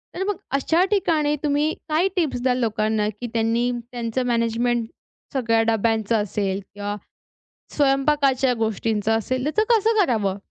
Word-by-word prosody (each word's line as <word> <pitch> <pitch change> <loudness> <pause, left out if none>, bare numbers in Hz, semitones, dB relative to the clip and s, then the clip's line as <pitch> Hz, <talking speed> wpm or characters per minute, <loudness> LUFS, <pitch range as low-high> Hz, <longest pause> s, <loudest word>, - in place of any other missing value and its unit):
तर 375 - -2
मग 410 -3 -1 0.2
अशा 325 +5 +2
ठिकाणी 315 -7 +2
तुम्ही 295 +1 +1 0.2
काय 320 +5 +2
टिप्स 305 -9 0
द्याल 255 -1 +2
लोकांना, 215 -2 0
की 245 - -4
त्यांनी 230 +2 +1 0.2
त्यांचं 240 +1 -2
मॅनेजमेंट 235 0 0 0.5
सगळ्या 230 -4 +2
डब्यांचं 225 0 +1
असेल 195 -1 -2
किंवा 205 0 -4 0.8
स्वयंपाकाच्या 275 -2 +2
गोष्टींचा 220 -1 0
असेल, 255 +3 -2
त्याचं 310 +10 +1
कसं 440 0 +2
करावं? 205 - 0
245 Hz, 130 wpm, -23 LUFS, 225-290 Hz, 0.8 s, अशा